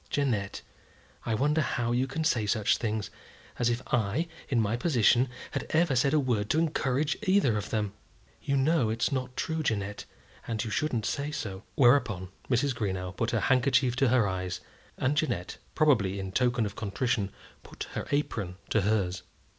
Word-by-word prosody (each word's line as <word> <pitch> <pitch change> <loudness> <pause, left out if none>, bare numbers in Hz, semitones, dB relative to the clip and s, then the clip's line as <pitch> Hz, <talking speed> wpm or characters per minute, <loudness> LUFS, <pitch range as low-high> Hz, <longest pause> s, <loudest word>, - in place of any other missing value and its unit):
"Jeannette, 115 -9 -1 0.6
I 110 - +1
wonder 150 +6 +2
how 120 -3 -1
you 125 +2 +1
can 160 +4 -3
say 115 -9 +1
such 105 0 +2
things; 110 -3 -2 0.5
as 120 -1 +3
if 120 +2 -1
I, 120 +9 +1 0.2
in 125 - +2
my 110 0 +1
position, 125 -2 +3 0.2
had - - -3
ever 160 -3 +2
said 135 +3 +3
a 155 - +4
word 115 -6 0
to - - +2
encourage 150 -2 0
either 190 - +3
of 105 0 -3
them. 105 -2 -1 0.5
You 140 - 0
know 135 -3 +3
it's 115 +2 0
not 130 -2 -3
true, 160 0 -1
Jeannette, 105 -7 -2 0.4
and 110 -3 -1
you 110 - -5
shouldn't 120 -2 0
say 140 +5 -1
so." 100 -10 -5
Whereupon 120 - +3 0.2
Mrs. 130 +2 +2
Greenow 95 -5 -3
put 115 - 0
her 115 -3 0
handkerchief 130 0 +3
to 135 +1 +4
her 120 -3 +3
eyes, 90 -1 -3 0.4
and 135 +3 +1
Jeannette, 145 - -1 0.2
probably 115 - +3
in 95 -1 -5
token 120 +1 +2
of 105 0 -5
contrition, 105 -1 -1 0.3
put - - -8
her - - -4
apron 110 -11 -1
to 110 - +3
hers. 95 -3 0
120 Hz, 175 wpm, -29 LUFS, 105-140 Hz, 0.6 s, a